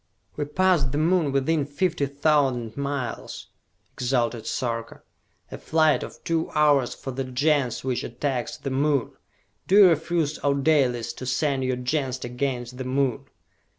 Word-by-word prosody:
"We 150 - -2
pass 180 +1 +2
the 135 +2 -2
Moon 160 -1 +2
within 140 +3 +1
fifty 145 +1 -1
thousand 135 -5 +1
miles!" 140 -3 -4 0.4
exulted 120 -2 -1
Sarka. 115 -2 -3 0.5
"A - - -7
flight 155 -1 +2
of - - -9
two 165 -1 -1
hours 145 -4 +3
for 135 - -6
the 135 +1 -3
Gens 130 0 0
which 130 -2 -1
attacks 125 +1 -3
the 135 - -5
Moon! 140 -1 +1 0.6
Do 190 - +3
you 200 -3 +9
refuse, 160 -1 0
O 140 -1 +2
Dalis, 130 -5 +1
to 130 - -8
send 135 0 0
your 130 0 0
Gens 130 0 -2
against 125 0 -3
the - - -2
Moon?" 130 -1 -1
140 Hz, 150 wpm, -25 LUFS, 125-150 Hz, 0.6 s, you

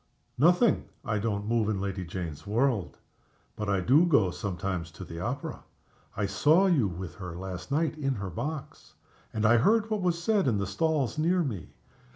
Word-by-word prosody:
"Nothing. 180 - +4 0.2
I 105 -2 0
don't 105 -1 -2
move 110 -1 +1
in 105 -3 -1
Lady 95 -1 -3
Jane's 85 -1 -6
world 115 -2 0 0.6
but 105 -1 -3
I 100 -2 +2
do 135 - +5
go 110 - +4
sometimes 90 -3 -3
to 80 - -10
the 85 0 -8
opera. 125 +10 -4 0.5
I 100 - +1
saw 150 - +4
you 155 - +3
with 90 -2 -6
her 90 -3 -7
last 90 +5 -6
night 155 +1 0
in 135 -2 0
her 100 -2 -5
box; 150 - -6 0.4
and 110 0 -1
I 120 +2 +6
heard 220 - +3
what 215 -2 0
was 175 -2 +1
said 200 -1 +2
in 115 -5 +2
the 100 - -1
stalls 150 - 0
near 175 +3 +2
me. 105 - -4
110 Hz, 185 wpm, -28 LUFS, 95-155 Hz, 0.6 s, I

